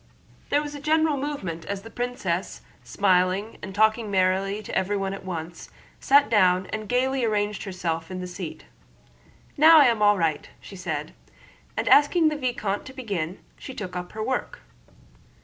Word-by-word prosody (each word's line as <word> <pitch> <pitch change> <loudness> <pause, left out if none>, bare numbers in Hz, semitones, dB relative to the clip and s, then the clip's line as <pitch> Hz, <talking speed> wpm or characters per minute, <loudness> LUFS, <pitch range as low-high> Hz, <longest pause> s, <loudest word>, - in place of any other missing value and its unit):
There 290 +1 +2
was 295 0 -6
a 290 - -7
general 310 +1 +2
movement 265 - -4
as 200 -1 -5
the 225 - -11
princess, 225 -8 -3 0.2
smiling 190 +2 +1
and 190 - -8
talking 220 +1 +2
merrily 195 +2 +1
to - - -6
everyone 195 0 -1
at 195 - -8
once, 175 -2 -6 0.3
sat 280 -3 +5
down 185 -4 +3
and 215 -1 -4
gaily 260 +1 +1
arranged 210 -2 -1
herself 165 -4 -3
in 185 -1 -5
her 180 - -5
seat. 180 -2 -7 0.9
"Now 320 +2 +8
I 290 - +7
am 230 -3 +2
all 205 0 +5
right," 160 -4 -1
she 195 - -12
said, 185 - -4 0.6
and - - -1
asking 310 +3 +5
the 305 - -3
vicomte 240 -7 -2
to 260 - -10
begin, 200 - -4 0.2
she 265 - -9
took 185 -3 -6
up 180 0 -6
her 215 - -4
work. 260 +3 -3
205 Hz, 165 wpm, -25 LUFS, 185-255 Hz, 0.9 s, Now